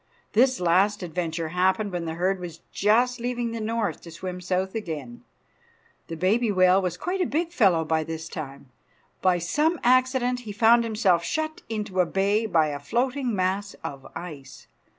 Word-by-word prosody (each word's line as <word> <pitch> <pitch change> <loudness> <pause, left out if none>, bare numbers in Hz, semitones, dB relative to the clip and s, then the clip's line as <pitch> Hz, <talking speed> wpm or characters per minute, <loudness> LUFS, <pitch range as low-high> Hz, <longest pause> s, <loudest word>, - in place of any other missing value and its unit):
This 255 +3 +4
last 185 +4 +2
adventure 165 -1 -3
happened 190 +4 +1
when 175 -2 -3
the 160 0 -4
herd 185 +3 0
was 170 -2 -8
just 240 +4 +2
leaving 240 -1 -2
the 230 -1 -4
north 225 0 -2
to 170 - -11
swim 180 +2 -6
south 185 +1 -1
again. 155 - -6 0.8
The 165 - -6
baby 210 +6 +2
whale 185 0 +4
was 180 -2 -2
quite 370 - -2
a 360 - +1
big 335 +3 -1
fellow 185 - +3
by 160 0 +1
this 160 +1 -6
time. 140 -5 -8 0.5
By 185 -1 +3
some 300 - 0
accident 255 0 +3
he 225 -4 -8
found 230 +2 +5
himself 210 -6 +2
shut 315 - -3
into 210 -4 -3
a 180 - +4
bay 200 +5 +1
by 160 -6 +3
a 145 -1 -4
floating 245 - -1
mass 195 +2 -1
of 140 -1 -7
ice. 150 -6 -9
190 Hz, 170 wpm, -25 LUFS, 170-235 Hz, 0.8 s, found